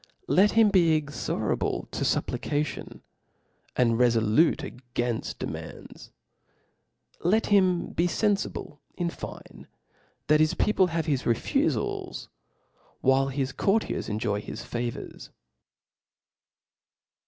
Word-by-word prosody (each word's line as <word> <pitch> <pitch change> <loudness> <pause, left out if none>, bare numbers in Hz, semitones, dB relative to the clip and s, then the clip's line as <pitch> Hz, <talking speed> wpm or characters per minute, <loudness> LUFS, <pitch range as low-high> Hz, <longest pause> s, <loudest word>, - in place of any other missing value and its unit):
Let 200 +3 +4
him 225 -2 +6
be 165 -5 +4
iC^orable 145 -1 -2
to - - -3
Ijupplication, 150 0 -2 0.7
and 115 -2 +2
refolute.agajnft 120 0 +1
der - - -4
mand3; - - -9 1.1
'let 215 +6 +3
him 185 -4 +2
be 170 - +1
fenfiblein 175 -4 -2
fine, - - -10 0.6
that 150 0 +4
his 155 0 +3
people 195 -3 +3
have 165 -2 -2
his 140 -5 0
fefufals, 115 -3 -1 0.7
while 135 +1 +3
his 135 0 -2
courtiers 195 +10 0
enjoy 105 -1 -1
his 110 - -7
favqrs. 120 0 -5
150 Hz, 95 wpm, -27 LUFS, 120-180 Hz, 1.1 s, him